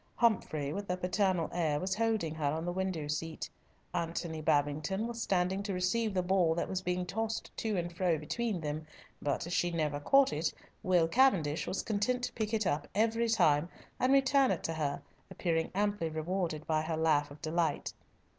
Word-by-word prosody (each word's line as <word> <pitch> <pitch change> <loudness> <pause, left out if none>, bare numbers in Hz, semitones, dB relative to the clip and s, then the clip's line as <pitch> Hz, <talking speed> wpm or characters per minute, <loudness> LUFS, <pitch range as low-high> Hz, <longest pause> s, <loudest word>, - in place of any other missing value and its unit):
Humfrey, 155 -11 +1
with 200 +1 -5
a 180 - 0
paternal 180 -1 +1
air, 160 -4 +1
was 185 +3 -1
holding 215 -7 0
her 155 -2 -1
on 160 +2 -3
the 175 - -1
window 185 -4 -2
seat; 160 +2 -3 0.5
Antony 165 -1 -2
Babington 155 +6 +1
was 235 0 -4
standing 190 0 +1
to 200 -2 -3
receive 210 +5 +1
the 185 - +2
ball 180 -3 +3
that 170 - -1
was 190 -1 -2
being 180 0 -1
tossed 220 +4 -3
to 215 -3 -1
and 175 -1 -3
fro 175 -2 +2
between 185 +5 -2
them, 155 0 -4 0.3
but 145 +1 -1
as 175 - -4
she 175 - +2
never 155 -4 -1
caught 275 - +4
it, 150 0 0 0.3
Will 180 -3 +3
Cavendish 170 - +3
was 190 - -2
content 230 +4 0
to - - -2
pick 215 -2 -2
it 220 -2 +1
up 145 -3 0
every 225 +2 +2
time 155 -7 +3 0.3
and 255 - +3
return 275 0 +4
it - - -1
to 165 - -1
her, 150 -3 -2 0.3
appearing 165 -2 -1
amply 205 -4 0
rewarded 160 0 -2
by 155 -1 +1
her 160 0 -2
laugh 155 -2 +2
of 145 +1 -12
delight. 165 +2 -1
175 Hz, 190 wpm, -32 LUFS, 155-205 Hz, 0.5 s, caught